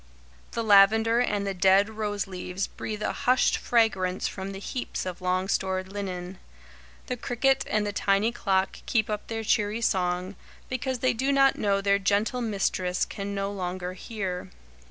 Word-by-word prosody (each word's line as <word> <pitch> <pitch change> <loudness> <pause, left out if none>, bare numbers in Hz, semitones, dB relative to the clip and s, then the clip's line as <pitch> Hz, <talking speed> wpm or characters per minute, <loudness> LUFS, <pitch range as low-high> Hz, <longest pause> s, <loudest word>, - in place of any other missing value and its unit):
The 230 - -1
lavender 220 +3 +5
and 205 -4 0
the 195 - -1
dead 190 +2 +4
rose 210 -2 -3
leaves 185 0 -4
breathe 215 -1 -6
a - - -1
hushed 255 +1 +2
fragrance 190 -6 +1
from 190 0 -5
the 195 - -7
heaps 245 +2 -4
of 185 0 -5
long 185 +1 0
stored 190 -1 -1
linen; 185 -2 -5 0.7
the 250 - -3
cricket 255 +3 +1
and 210 0 +1
the 205 - -3
tiny 200 +3 +2
clock 195 -4 0
keep 220 -2 +1
up 210 -1 -4
their 225 -1 -3
cheery 210 +1 +1
song, 180 -2 0 0.3
because 255 0 -2
they - - +4
do 260 +4 0
not 275 -1 +4
know 200 -1 +1
their 200 0 +3
gentle 205 +6 +1
mistress 190 -4 0
can 200 0 -5
no 195 0 -2
longer 185 -2 -4
hear. 185 -2 -5
200 Hz, 165 wpm, -27 LUFS, 190-225 Hz, 0.7 s, lavender